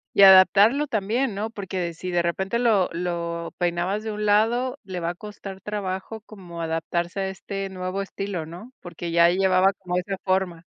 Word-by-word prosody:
Y 200 - +6
adaptarlo 205 +9 +7
también, 220 +1 -1
¿no?, 215 +2 -3
porque 185 -5 -4
si 180 +2 -6
de 175 - +1
repente 190 +6 -1
lo 220 -6 +3
lo 170 -1 -3
peinabas 175 +4 -1
de 220 - -4
un 210 0 -3
lado, 235 +5 +2
le 185 -2 -6
va 170 0 -2
a - - -5
costar 195 -1 -9
trabajo 200 +1 -4
como 180 -6 -10
adaptarse 165 +3 -2
a 190 - -1
este 195 +1 -5
nuevo 185 +1 -3
estilo, 195 -3 -5
¿no?, 180 +11 -11
porque 170 -1 -7
ya 170 0 +6
llevaba 190 +1 +3
como 180 -2 -5
esa 195 +2 -3
forma. 185 -3 0
190 Hz, 180 wpm, -24 LUFS, 175-205 Hz, -, adaptarlo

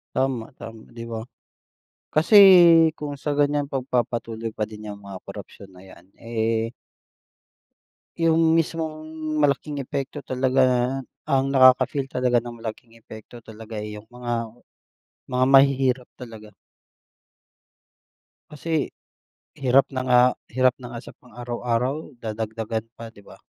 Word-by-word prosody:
Tama, 130 -3 -1
tama 115 -1 -11
'di 115 - -7
ba? 115 +1 -5 0.9
Kasi 165 +8 +4 0.6
kung 145 -2 -6
sa 145 0 -2
ganiyan, 145 0 +1
pagpapatuloy 120 -4 -3
pa 110 - -4
din 105 0 -6
'yang 105 - -6
mga 100 -2 -8
korapsiyon 95 -2 -11
na 90 - -15
'yan, 90 -2 -16 0.2
eh 115 0 -1 1.5
Yung 165 0 +3
mismong 160 -1 -2 0.3
malaking 145 +1 0
epekto 140 +2 -5
talaga, 130 +1 +1 0.6
ang 135 0 +1
nakaka-feel 130 +1 +4
talaga 125 -2 +1
ng 120 -1 -10
malaking 115 +1 -8
epekto 115 +1 -13
talaga, 110 0 -10
eh, 105 0 -6
yung 110 - -18
mga 120 -2 -5 0.8
mga 125 0 +2
mahihirap 135 -2 +3
talaga. 110 -4 -11 2.0
Kasi 155 +1 -3 0.7
hirap 135 0 +4
na 130 - -2
nga 125 0 +5 0.4
hirap 130 0 +3
na 120 -1 -9
nga - - -5
sa - - -11
pang 125 -3 -21
araw-araw, 125 +4 -3
dadagdagan 110 0 -4
pa, 115 -1 -10
'di 100 - -18
ba? 100 - -15
125 Hz, 125 wpm, -23 LUFS, 115-135 Hz, 2.0 s, nga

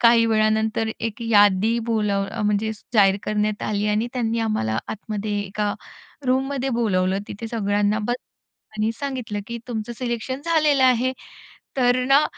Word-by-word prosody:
काही 230 -1 +6
वेळानंतर 220 0 +1
एक 230 0 -4
यादी 210 0 +4
बोलव 205 -3 +1
अ, 225 - -4
म्हणजे 210 +1 +1
स - - -19
जाहीर 195 -2 +5
करण्यात 210 0 -1
आली 210 0 0
आणि 215 +3 +1
त्यांनी 230 -2 0
आम्हाला 110 - 0
आतमध्ये 210 -1 -3
एका 205 +1 -2 0.5
रूममध्ये 265 +1 0
बोलावलं 190 -3 +1
तिथे 225 +3 -6
सगळ्यांना 205 -1 +1
बस 245 - +1 0.6
आणि 215 +1 +1
सांगितलं 250 -7 -3
की 235 0 -5
तु 240 - -4
मचं 220 +2 -3
सिलेक्शन 250 +2 -3
झालेलं 305 -5 +3
आहे. 255 +1 +3 0.6
तर 250 0 +3
ना 275 +3 +5
220 Hz, 150 wpm, -23 LUFS, 210-240 Hz, 0.6 s, काही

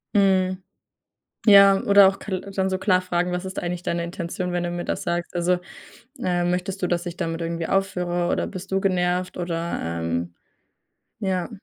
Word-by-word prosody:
Mhm. 185 -2 +2 0.8
Ja, 200 -1 +8
oder 200 -1 +6
auch 195 +1 0
kal 190 -3 -4
dann 195 -1 -2
so 190 - -1
klar 185 -1 +2
fragen: 180 0 -1
„Was 180 +1 -3
ist 190 - -7
eigentlich 175 0 -3
deine 170 -1 -1
Intention, 175 +1 -4
wenn 175 0 -1
du 175 - -2
mir 175 0 -4
das - - -3
sagst?“ 175 0 -3
Also, 175 +1 +2 0.7
äh: 180 -6 0
„Möchtest 180 +2 -2
du, 180 - +2
dass 175 0 -1
ich 175 0 -6
damit 165 0 -3
irgendwie 165 0 -3
aufhöre, 180 -3 0
oder - - 0
bist 190 0 -8
du 195 - +2
genervt?“ 180 -1 0
Oder, 170 -1 -3
ähm 85 +1 -3 0.9
ja. 190 -3 -1
180 Hz, 180 wpm, -24 LUFS, 175-190 Hz, 0.9 s, Ja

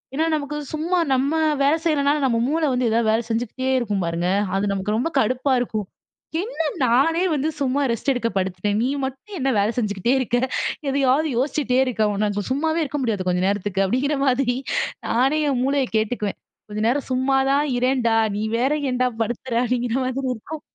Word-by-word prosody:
ஏனா, 315 +3 +1
நமக்கு 295 -1 -2
சும்மா 325 +4 -1
நம்ம 265 +2 +2 0.3
வேலை 285 +3 +4
செய்றனால, 290 -2 +2
நம்ம 240 -3 +2
மூளை 315 +3 +1
வந்து 250 -1 +1
ஏதாவது 225 0 +1
வேலை 225 +2 +1
செஞ்சுகிட்டே 240 +3 -2
இருக்கும். 205 -6 -1
பாருங்க, 170 +1 -1 0.3
அது 195 +1 +1
நமக்கு 200 +1 -1
ரொம்ப 245 +9 0
கடுப்பா 255 +3 +1
இருக்கும். 215 -4 -2 0.6
"என்ன 435 -2 -4 0.2
நானே 275 +8 +3
வந்து 295 +2 0
சும்மா 275 +1 +1
ரெஸ்ட் 235 +4 0
எடுக்க 240 -2 -1
படுத்துட்டேன். 190 +2 -1
நீ 250 - +1 0.2
மட்டும் 270 +10 -7
என்ன 270 0 +1
வேலை 205 +2 +2
செஞ்சுகிட்டே 210 0 0
இருக்க? 245 -1 0 0.5
எதையாவது 275 +3 +2
யோசிச்சுட்டே 260 -1 +1
இருக்க, 220 -4 +1
உன்னால 205 0 -1
சும்மாவே 315 +4 +1
இருக்க 295 0 -3
முடியாத 210 -6 -1
கொஞ்ச 180 0 +1
நேரத்துக்கு. 200 -1 0
"அப்படிங்கிற 270 +8 0
மாரி 250 -2 +1 0.5
நானே 270 +6 +2
என் 265 -3 0
மூளைய 275 0 +1
கேட்டுக்குவேன். 215 -2 -2 0.3
"கொஞ்ச 210 0 -4
நேரம் 275 +3 -1
சும்மா 260 +1 +2
தான் 285 +2 +2
இரேன்டா, 245 -2 +2 0.2
நீ 210 - -2 0.2
வேற 260 +4 +2 0.2
ஏன்டா 250 0 +1
படுத்துற?" 240 +2 -4
அப்படிங்கிற 245 -1 -1
மாரி 255 +1 -2 0.2
இருக்கும். 300 +7 -8
255 Hz, 170 wpm, -22 LUFS, 220-280 Hz, 0.6 s, வேலை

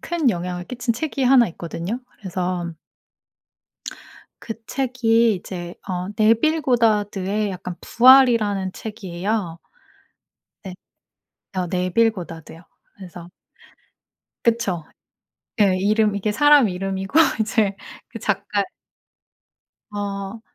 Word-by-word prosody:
큰 330 -5 0
영향을 180 -1 -4
끼친 245 -1 -2
책이 280 +2 -3
1 250 -2 +5
있거든요. 170 +6 -5 0.2
그래서 180 -3 -3 1.7
그 225 - -5
책이 235 -4 +2
이제 175 -2 -7
어 180 0 -3
네빌 230 +9 +3
고다드의 210 -4 +1
약간 180 -1 -6
부활이라는 230 -7 +5
책이에요. 195 -4 -4 1.1
네. 190 -2 -7 0.8
어 180 -1 0
네빌 185 +6 +2
고다드요. 165 -4 -9 0.3
그래서 175 -3 -11 1.2
그쵸. 215 -8 0 0.8
예 195 -2 +4
이름 210 +2 +2
이게 205 +1 -1
사람 290 0 +5
이름이고 195 - -1 0.2
이제 215 -2 +1 0.3
그 230 - -8
작가 205 -1 -1 1.3
어 200 +1 -5
205 Hz, 200 characters per minute, -22 LUFS, 185-230 Hz, 1.7 s, 1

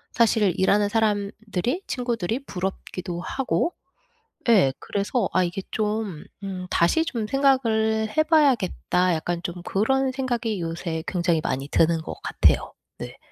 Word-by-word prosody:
사실 220 -5 +3
일하는 205 +2 +3
사람들이 215 - -1
친구들이 240 0 -2
부럽기도 180 -2 -4
하고. 270 - -1 0.8
예. 195 - +5
그래서 205 +2 -1
'아 185 - +3
이게 175 +2 -3
좀 210 -6 -2 0.2
음 185 -2 -5
다시 180 - +2
좀 235 -9 -3
생각을 220 -5 +2
해봐야겠다.' 260 - +2
약간 170 +2 -2
좀 175 -1 -5
그런 265 +8 +1
생각이 240 -6 -2
요새 165 -1 -3
굉장히 170 -3 +1
많이 135 -1 -2
드는 165 +1 +3
것 - - -6
같아요. - - +2 0.3
네. - - -7
210 Hz, 275 characters per minute, -24 LUFS, 180-240 Hz, 0.8 s, 예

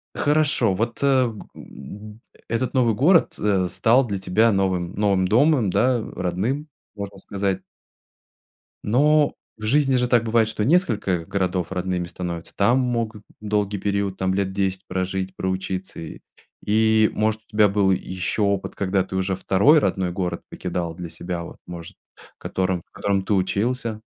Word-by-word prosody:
Хорошо. 145 -8 +2
Вот, 115 +7 -2
э, - - +4
м, 110 - -3 0.3
этот 115 +2 -1
новый 120 -5 +3
город, 165 - +4
э, 95 -3 +1
стал 120 +8 +3
для 100 -2 -2
тебя 105 +5 +2
новым, 95 -3 0
новым 100 -3 +2
домом, 125 - +3
да, 125 +5 +2
родным, 105 - -2 0.3
можно 100 -1 -7
сказать 100 -1 -2 1.2
но 145 +6 +3 0.2
в 110 - -12
жизни 135 +2 +3
же 125 0 +1
так 120 -2 +3
бывает, 115 -1 +2
что 110 -1 -2
несколько 110 - +1
городов 95 -2 -1
родными 90 -1 -2
становятся. 85 -1 -6
Там 120 +6 +3
могут 115 -4 -2 0.2
долгий 105 -1 -1
период, 100 -1 -1
там 95 0 0
лет 95 0 0
10 95 -1 -1
прожить, 95 +1 -3
проучиться. 95 0 -3
И 80 - -8 0.4
и, 110 +1 +4
может, 110 0 0
у - - -28
тебя 105 -1 +4
был 100 -1 +2
ещё 95 +3 -2
опыт, 100 -1 -1
когда 95 -1 0
ты 95 - -7
уже 95 0 -1
второй 120 +12 +4
родной 95 -8 0
город 90 -1 -3
покидал 85 -2 -4
для 85 0 -7
себя, 85 +1 -5
вот, - - -10
может, 85 -2 -9 0.4
котором 95 -2 -2
в - - -48
котором 100 -1 -1
ты 105 - -1
учился? 110 +4 -1
100 Hz, 155 wpm, -23 LUFS, 95-115 Hz, 1.2 s, э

